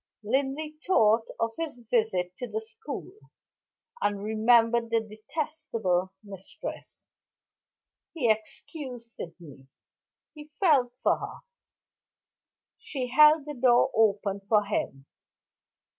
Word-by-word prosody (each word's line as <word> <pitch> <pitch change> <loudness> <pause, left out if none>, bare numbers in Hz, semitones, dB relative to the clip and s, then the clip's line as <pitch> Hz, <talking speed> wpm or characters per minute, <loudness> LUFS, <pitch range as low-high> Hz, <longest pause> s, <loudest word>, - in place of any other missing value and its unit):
Linley 275 +6 -1
thought 225 - +4
of 230 0 0
his 325 -6 -3
visit 220 -6 0
to 250 - -5
the 440 - -3
school, 445 -3 -7 0.9
and 205 -1 0
remembered 230 +2 +3
the 230 0 +3
detestable 220 - -3
mistress. 195 -2 -8 1.1
He 275 -8 +1
excused 235 +3 -3
Sydney; 160 -9 -11 0.7
he 300 -1 -11
felt 285 -10 +4
for - - +3
her. - - -7 1.4
She 255 -4 -4
held 300 +2 +6
the 300 - -5
door 250 0 +4
open 205 -2 +2
for 205 +1 +2
him. 135 -9 -3
230 Hz, 100 wpm, -28 LUFS, 205-285 Hz, 1.4 s, held